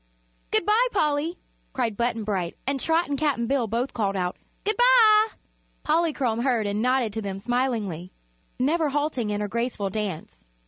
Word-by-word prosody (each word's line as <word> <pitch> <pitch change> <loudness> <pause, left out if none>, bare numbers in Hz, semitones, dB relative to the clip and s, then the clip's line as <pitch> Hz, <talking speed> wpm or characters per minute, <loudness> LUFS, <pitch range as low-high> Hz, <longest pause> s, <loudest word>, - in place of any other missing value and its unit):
"Good - - +1
bye, 445 +4 +4
Polly!" 310 -1 0 0.4
cried 235 -5 -1
Button 235 0 -1
Bright, 190 -5 -2
and 275 +1 -1
Trot 325 +5 +1
and 285 -2 -2
Cap'n 285 -6 +1
Bill 255 -2 0
both 235 +5 -2
called 200 -4 -1
out: 180 -1 -1 0.3
"Good 425 +2 0
bye!" 455 -3 +6 0.6
Polychrome 300 -8 +1
heard 240 -4 +1
and 205 +1 -1
nodded 250 -3 +1
to 220 - -2
them 195 -2 -4
smilingly, 215 -6 -2 0.5
never 305 +4 +1
halting 285 -6 -1
in 205 0 -1
her 210 - -1
graceful 235 -2 -2
dance. 200 -6 -5
245 Hz, 165 wpm, -25 LUFS, 210-300 Hz, 0.6 s, bye